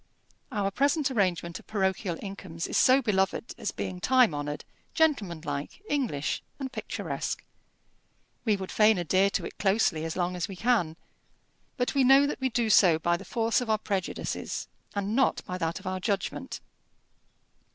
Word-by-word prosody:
Our 200 -2 0
present 280 - +1
arrangement 180 -7 0
of - - -19
parochial 190 -3 -1
incomes 195 -4 -6
is - - +3 0.2
beloved 195 +2 0
as - - -2
being 185 -1 -5
time 255 -3 +4
honoured, 145 0 -4 0.3
gentlemanlike, 170 - 0
English, 245 - -1 0.2
and 270 -2 -5
picturesque. - - -4 1.0
We 215 -4 +3
would 190 -1 -6
fain 215 -1 +5
adhere 185 +3 +3
to - - -2
it - - -9
closely 195 -6 +2
as 165 0 -3
long 180 0 -1
as 175 - -2
we 195 - -7
can, 195 -8 +1 0.8
but 245 -1 0
we 275 - +3
know 270 +2 +7
that 285 - -3
we 260 - +1
do 230 -2 +1
so 180 -6 +6
by 175 +2 +1
the - - -6
force 230 0 +1
of 245 - -4
our 215 - +3
prejudices, 195 -3 -3 0.3
and 200 +2 -1
not 265 0 +2
by 180 0 -5
that 165 0 -1
of - - -16
our 185 0 -2
judgment. 200 0 -3
195 Hz, 160 wpm, -28 LUFS, 175-235 Hz, 1.0 s, know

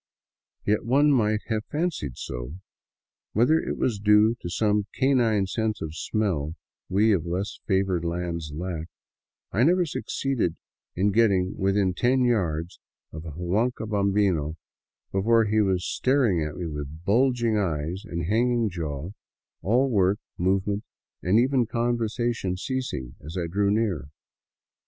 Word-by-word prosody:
Yet 105 +1 +1
one 140 +5 +4
might 110 -5 +2
have 110 -1 0
fancied 150 - -2
so. 60 +3 -6 0.8
Whether 125 +9 +4
it - - -3
was 115 -6 0
due 105 +2 +5
to 85 - -6
some 105 +2 +1
canine 120 -7 +3
sense 110 +3 -2
of 80 -1 -5
smell 85 -6 -1 0.3
we 105 +4 +3
of 85 -3 -1
less 95 +4 -3
favored 95 -3 +1
lands 85 -2 -3
lack, 80 +1 -4 0.6
I 105 - +1
never 175 +6 +4
succeeded 135 - -2 0.4
in 100 +3 +2
getting 100 -4 +2
within 95 -1 +1
ten 125 +6 +2
yards 85 -8 0 0.3
of 80 +1 -8
a 80 - -6
huanca 105 - -1
bambino 100 -7 +1 0.6
before 110 +4 +3
he 110 +1 +2
was 95 -3 +1
staring 125 - +2
at 75 -1 -4
me 90 - -4
with 75 0 -6
bulging 120 +1 +2
eyes 85 0 -2
and 85 -1 -4
hanging 115 +2 +1
jaw, 80 -1 -4 0.5
all 125 +7 +3
work, 100 -2 +3 0.2
movement, 95 +3 0 0.4
and 90 +5 +3
even 125 0 +3
conversation 120 -4 -1
ceasing 100 - -4
as 80 +5 -7
I 85 - -1
drew 100 +4 +1
near. 100 -9 0
100 Hz, 135 wpm, -26 LUFS, 85-115 Hz, 0.8 s, due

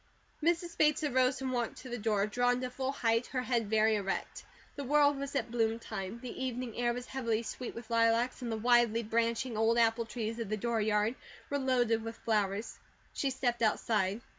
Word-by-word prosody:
Mrs. 340 +1 0
Bates 305 0 +3
arose 260 -2 +2
and 260 -1 -2
walked 240 -2 -2
to 260 - -8
the 240 0 -4
door, 210 -2 +1
drawn 245 +3 +1
to 255 -1 -3
full 260 +1 -2
height, 230 -3 +1
her 255 -2 -2
head 235 -5 0
very 220 0 +4
erect. 195 -1 -3 0.3
The 285 - -4
world 290 +1 +4
was 280 0 -5
at 260 - -1
bloom 225 -1 +1
time. 215 -1 -6
The 250 +1 -5
evening 250 -2 -3
air 240 0 +1
was 245 +1 -5
heavily 230 -4 -1
sweet 245 +2 -6
with 235 0 -9
lilacs, 230 +2 +2
and 240 -2 -3
the 220 - -1
widely 235 0 +3
branching, 230 +2 0
old 225 +1 +3
apple 230 0 +2
trees 230 -1 -4
of 225 -4 -4
the 215 - -1
dooryard 215 -1 +1 0.4
with 285 -1 0
loaded 245 -4 +2
with 225 0 -6
flowers. 210 -1 -1 0.3
She 275 - 0
stepped 245 -3 -1
outside. 215 -2 +1
235 Hz, 195 wpm, -32 LUFS, 225-255 Hz, 0.4 s, very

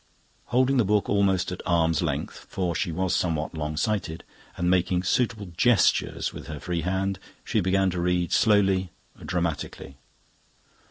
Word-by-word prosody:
Holding 130 +2 +2
the 120 - +4
book 105 0 +1
almost 95 -3 +2
at 90 - -5
arm's 80 -3 +2
length, - - -3
for 90 -3 -1
she 85 +1 -1
was 95 +2 0
somewhat 80 -3 -1
long 75 -1 -4
sighted, 85 -2 -1 0.3
and 90 - -1
making 90 0 +2
suitable 105 -1 0
gestures 115 +1 +2
with - - -9
her 75 -2 -6
free 85 0 -2
hand, 95 +2 -1 0.2
she 110 - 0
began 95 +1 +2
to 90 0 -2
read, 90 0 0
slowly, 95 -4 +3 0.3
dramatically. 85 -5 -3
90 Hz, 150 wpm, -26 LUFS, 85-100 Hz, 0.3 s, the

